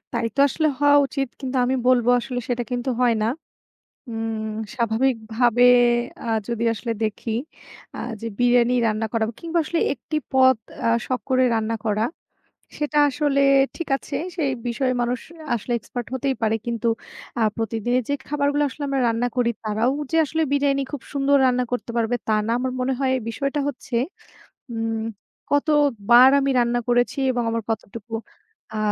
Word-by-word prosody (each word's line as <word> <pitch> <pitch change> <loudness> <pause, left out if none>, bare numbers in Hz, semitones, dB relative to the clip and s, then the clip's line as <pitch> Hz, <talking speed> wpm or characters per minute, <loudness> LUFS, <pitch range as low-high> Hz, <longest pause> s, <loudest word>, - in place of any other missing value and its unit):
তাই 235 -1 0
তো - - +2
আসলে 315 +3 0
হওয়া 290 0 +6
উচিত। 270 -1 -2
কিন্তু 265 -1 -3
আমি 255 - +1
বলব, 250 -2 +4
আসলে 250 0 -4
সেটা 245 -1 0
কিন্তু 245 +1 -1
হয় 245 -2 +4
না। - - +2 0.8
উম 225 -1 -3 0.2
স্বাভাবিকভাবে 235 0 +1 0.6
আ - - -5 0.2
যদি 235 -1 -1
আসলে 230 +1 -3
দেখি 220 +1 -2 0.7
আ - - -7 0.2
যে 230 - -5
বিরিয়ানি 245 0 +4
রান্না 220 0 0
করা 225 -2 +1 0.2
কিংবা 335 0 -1
আসলে 330 +2 -1
১ - - -7
টি 310 - 0 0.2
পদ 260 -1 +5 0.2
অ্যা - - 0 0.2
শখ 255 -2 -1
করে 255 0 +4
রান্না 225 0 0
করা। 215 0 +1 0.7
সেটা 295 0 0
আসলে 285 0 +1 0.4
ঠিক 335 - -5
আছে। - - -9 0.2
সেই 295 -6 0 0.2
বিষয়ে 255 +2 0
মানুষ 240 +1 0 0.4
আসলে 240 +1 -3
expert 240 +2 -6
হতেই 265 +1 0
পারে। 220 0 +2
কিন্তু 235 -1 -2 0.5
আ - - +3
প্রতিদিনের 225 +2 0
যে 285 - +1
খাবারগুলা 290 0 +1
আসলে 290 - -9
আমরা 275 -1 0
রান্না 230 +1 0
করি 245 -1 +2
তারাও 220 +4 +1 0.2
যে 325 - +1
আসলে 320 +2 -1
বিরিয়ানি 280 -1 +2
খুব 290 - -4
সুন্দর 280 0 +3
রান্না 250 0 +2
করতে 235 -2 -3
পারবে 230 +1 +1
তা - - +3
না। - - -1
আমার 255 0 -2
মনে 255 +1 0
হয় 265 -1 +2 0.2
বিষয়টা 275 +6 -2
হচ্ছে, 260 -3 -5 0.8
উম 225 -1 -2 0.5
কত 285 +1 +2 0.4
বার 245 +2 +9
আমি 275 0 0
রান্না 240 0 +1
করেছি 245 +2 +2
এবং 245 -1 -1
আমার 230 0 -1
কতটুকু 225 +1 -5 0.6
আ - - -2
245 Hz, 165 wpm, -23 LUFS, 230-275 Hz, 0.8 s, বার